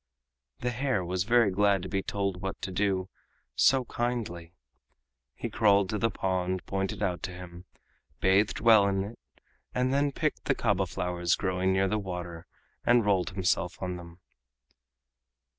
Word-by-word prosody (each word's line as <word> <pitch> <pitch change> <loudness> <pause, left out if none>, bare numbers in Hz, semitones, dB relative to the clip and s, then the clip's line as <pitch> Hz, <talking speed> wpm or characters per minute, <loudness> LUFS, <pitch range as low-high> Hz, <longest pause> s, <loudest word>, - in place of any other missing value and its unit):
The 125 - 0
hare 125 -6 -1
was 90 +2 -1
very 115 -2 +4
glad 100 -1 +2
to - - -4
be 95 0 -1
told 100 -2 -2
what 95 0 -4
to 95 - -3
do, 95 -1 0 0.5
so 130 -1 +4
kindly. 110 -9 -3 0.8
He - - -4
crawled 100 -2 +3
to 105 - -1
the 115 - +2
pond 95 -2 -2
pointed 95 +1 -2
out 90 -4 -1
to 95 - -4
him, 90 0 -10 0.5
bathed 95 +2 +3
well 110 -3 +6
in 95 -1 0
it, 105 +4 -9 0.6
and 125 +1 +1
then 140 +1 +2
picked - - -2
the - - +2
kaba - - +1
flowers 90 -1 0
growing 95 0 0
near 95 +1 +2
the 105 +3 0
water, 90 -4 -6 0.4
and 120 -2 +4
rolled 100 -2 +2
himself 90 -1 -1
on 90 -1 -3
them. 85 -1 -11
95 Hz, 160 wpm, -29 LUFS, 90-105 Hz, 0.8 s, well